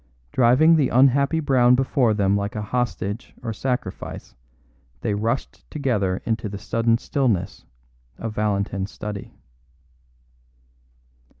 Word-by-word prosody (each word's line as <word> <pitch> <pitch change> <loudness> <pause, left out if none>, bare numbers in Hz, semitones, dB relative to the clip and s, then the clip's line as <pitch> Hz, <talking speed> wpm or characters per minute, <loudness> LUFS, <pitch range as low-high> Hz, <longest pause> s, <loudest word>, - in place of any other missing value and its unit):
Driving 130 +7 +5
the 140 -5 +2
unhappy 140 +5 +4
Brown 125 -4 +4
before 125 -3 +2
them 100 -1 +2
like 100 +1 -2
a 105 - -2
hostage 115 -1 -3
or 115 -2 -3
sacrifice, 125 -3 -4 0.7
they 105 - -1
rushed 115 +5 -3
together 105 -11 -1
into 110 -2 -1
the 100 - -6
sudden 115 +3 +1
stillness 115 - -1 0.5
of 115 -1 -5
Valentin's 100 -2 -1
study. 105 -2 -7
115 Hz, 110 wpm, -23 LUFS, 100-130 Hz, 0.7 s, Driving